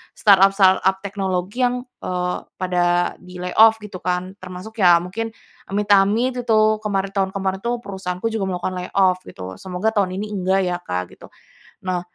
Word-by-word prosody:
startup-startup 195 -1 +5
teknologi 195 +4 -1
yang, 245 0 -3 0.2
eee, 180 0 -2 0.2
pada 175 -1 +1
di-layoff 180 +5 +3
gitu 195 -3 -8
kan 180 +2 -3
termasuk 185 +5 -9
ya 175 -3 +6
mungkin 225 +5 -5 0.3
amit-amit 205 +4 +3 0.2
itu 215 -1 +4
kemarin 195 -2 -2
tahun 195 -1 -1
kemarin 190 -1 -1
tuh 235 +3 -1
perusahaanku 190 +1 -4
juga 210 -4 -2
melakukan 180 0 -2
layoff 185 0 +2
gitu, 95 0 -8
semoga 190 +4 -2
tahun 195 -4 0
ini 210 +2 -4
enggak 190 -1 +1
ya 180 -1 -1
Kak 90 - -4
gitu. - - -14 0.6
Nah, 180 -1 0
190 Hz, 150 wpm, -21 LUFS, 180-210 Hz, 0.6 s, ya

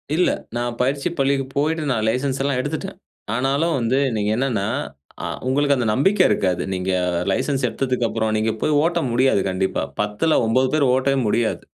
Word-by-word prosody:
இல்ல. 180 - +3 0.3
நான் 120 0 -3
பயிற்சி 140 +5 0
பள்ளிக்கு 135 0 +1
போயிட்டு 155 +2 0
நான் 110 -3 0
லைசென்ஸ்ல்லாம் 135 +1 -1
எடுத்துட்டேன். 150 +3 -4 0.4
ஆனாலும், 140 +7 +1
வந்து 120 +3 +1 0.2
நீங்க 105 0 0
என்னன்னா 120 -7 0 0.6
அ - - -2 0.2
உங்களுக்கு 140 +2 +2
அந்த 125 -3 -1
நம்பிக்கை 185 - +3
இருக்காது. 90 -2 0
நீங்க 95 +1 -2 0.4
லைசென்ஸ் 135 +6 0
எடுத்ததுக்கு 125 -3 -1
அப்புறம், 110 -1 -1
நீங்க 110 +1 +1
போய் 155 - +1
ஓட்ட 170 +1 +1
முடியாது 125 -3 +3
கண்டிப்பா. 95 +1 -1 0.2
10ல 105 +10 +1
9 130 +4 +2
பேர் 155 -2 +3
ஓட்டவே 135 +1 +1
முடியாது. 115 +1 0
130 Hz, 160 wpm, -21 LUFS, 115-140 Hz, 0.6 s, இல்ல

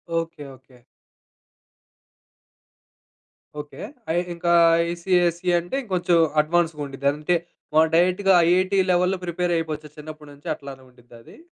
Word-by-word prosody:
Okay. 165 -2 -3
Okay. 130 0 -22 2.8
Okay. 150 0 -9 0.3
I - - -1 0.2
ఇంకా 170 0 0 0.3
ICSE 175 0 0
అంటే 175 +9 -6
ఇంకొంచెం 180 -5 +1 0.2
అడ్వాన్స్‌గా 165 0 -1
ఉండిద్ది. 140 0 -4
అంటే 150 +4 -1 0.4
మనం 160 +1 +5
డైరెక్ట్‌గా 185 +3 +3 0.2
ఐఐటీ 185 +2 +2
లెవెల్‌లో 180 +1 +1
ప్రిపేర్ 175 0 -1
అయిపోవచ్చు. 155 -2 -5
చిన్నప్పటి 150 0 -10
నుంచి 145 +4 -10
అట్లానే 140 -3 -11
ఉండిద్దా 120 -1 -18
అది? - - -16
170 Hz, 115 wpm, -23 LUFS, 150-180 Hz, 2.8 s, మనం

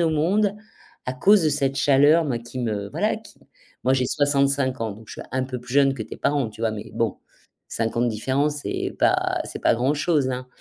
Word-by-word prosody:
au 165 -1 +2
monde, 195 +7 +1 0.5
à 125 - -1
cause 190 +9 +4
de 155 - +3
cette 140 -2 0
chaleur, 145 +4 +4
moi 130 -6 -1
qui 120 +2 -9
me 105 -4 -2
voilà, - - 0
qui - - -15 0.5
moi 130 - +3
j'ai 130 -1 +1
65 140 -2 +1
ans, 110 -1 -1
donc 110 +3 -13
je - - -8
suis - - -9
un 130 0 0
peu 130 -1 -5
plus 125 +1 -8
jeune 140 -1 +4
que 120 - -5
tes - - -9
parents, 140 -6 0
tu 105 - -14
vois? 115 -1 +1
Mais 110 0 -7
bon, 115 -4 -1 0.5
5 115 0 -2
ans 120 - +2
de 120 - +2
différence, 135 +7 0
c'est - - -3
pas - - +2
c'est - - -7
pas - - +3
grand-chose, 140 +3 +1
hein. 125 0 -4
130 Hz, 225 wpm, -23 LUFS, 120-145 Hz, 0.5 s, cause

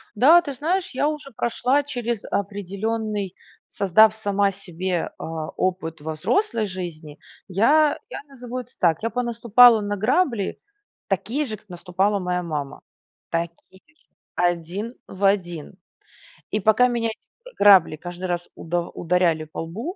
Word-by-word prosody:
Да, 305 +11 +7
ты 290 -5 -5
знаешь, 345 +8 -1
я 280 +3 +1
уже 300 -2 -6
прошла 250 +5 +1
через 240 -6 -3
определенный, 205 +1 -3 0.3
создав 210 +2 +5
сама 200 -2 +1
себе, 185 -2 -3
а, 160 -1 -5
опыт 170 -4 -2
во 160 +1 -4
взрослой 230 - 0
жизни. 170 -5 -7 0.3
Я 285 - +3
я - - -6
назову 250 -2 -7
это 250 -1 -9
так, 165 -3 +2
я 230 - -1
понаступала 235 -1 +5
на 205 0 -2
грабли, 235 - +1 0.5
такие 285 +6 -1
же, 220 -5 -5
как 210 0 -28
наступала 185 +3 0
моя 180 -1 -2
мама, 150 -4 -5 0.5
Такие 170 +3 -5
же, 305 +1 -32 0.3
1 175 +6 -1
в 190 +1 -8
1. 175 -6 0 0.8
И 210 - 0
пока 220 +5 +4
меня 235 -2 -1
эти, 220 - -7 0.3
э, - - -18
грабли 195 -6 +6
каждый 175 +3 -7
раз 175 -1 -3
удав 170 +1 -3
ударяли 170 -2 +1
по 155 - -9
лбу, 225 - -6
200 Hz, 145 wpm, -23 LUFS, 175-240 Hz, 0.8 s, Да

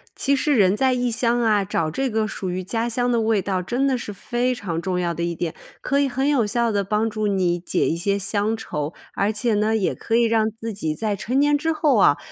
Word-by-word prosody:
其 280 +1 +2
实 290 +1 +1
人 195 -3 +4
在 260 +3 +2
异 245 -1 0
乡 240 0 +1
啊， 215 -3 +3
找 165 -5 -1
这 265 - -1
个 220 -1 0
属 190 -3 -5
于 185 +1 -3
家 225 +5 -2
乡 245 +1 0
的 230 -1 +2
味 220 -3 +2
道 190 -2 -1
真 245 +8 -1
的 265 -2 +2
是 215 - -6
非 245 +5 -1
常 170 -7 -4
重 180 -1 -1
要 175 -1 -1
的 170 - -5
一 170 -1 -2
点， 165 -1 -3 0.3
可 280 0 +1
以 280 -1 +2
很 265 +3 -1
有 260 -7 +2
效 235 +1 +1
地 200 -1 0
帮 210 +3 0
助 215 0 -2
你 180 -3 +1
解 175 - 0
一 165 - 0
些 200 +4 0
乡 205 +2 -1
愁。 150 -7 -4 0.2
而 200 +2 +1
且 220 +2 0
呢， 215 +1 +1
也 195 - 0
可 225 - -2
以 235 - +4
让 220 -1 +2
自 225 0 -7
己 160 -6 -3
在 215 -2 -1
成 250 +7 -1
年 290 +1 +4
之 320 +3 0
后 300 -6 +2
啊， 145 -7 +5
220 Hz, 275 characters per minute, -22 LUFS, 195-245 Hz, 0.3 s, 啊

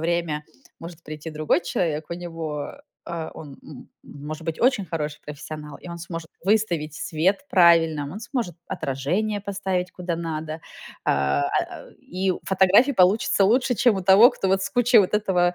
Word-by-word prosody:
время 165 -2 -1 0.3
может 165 0 -10
прийти 155 +1 -8
другой 155 - 0
человек, 160 - -2
у 170 - -2
него, 165 -4 -5
э - - -17 0.2
э, 165 -2 -5
он, 145 -3 -10
м, 145 -5 -12 0.2
может 155 +3 -8
быть 165 -1 -4
очень 245 -5 +3
хороший 150 -3 -4
профессионал. 150 0 -8
И - - -11
он 170 0 -7
сможет 165 -1 -7 0.2
выставить 180 -8 +1
свет 180 - 0
правильно, 165 -5 +4
он 210 - -7
сможет 230 - -3
отражение 180 +11 -2
поставить 190 -2 -2
куда 180 -1 -4
надо, 160 -1 -4 0.4
а, 70 +1 +1 0.4
э, - - -20
и 185 +2 -2
фотографии 195 +8 +4
получатся 195 0 +3
лучше, 245 +4 +3
чем 235 -2 +3
у 190 - -3
того, 200 +6 +8
кто 195 - -3
вот 190 0 +2
с 195 - -3
кучей 245 -1 +4
вот 195 0 +3
этого, 180 -4 +2
170 Hz, 165 wpm, -24 LUFS, 155-195 Hz, 0.4 s, того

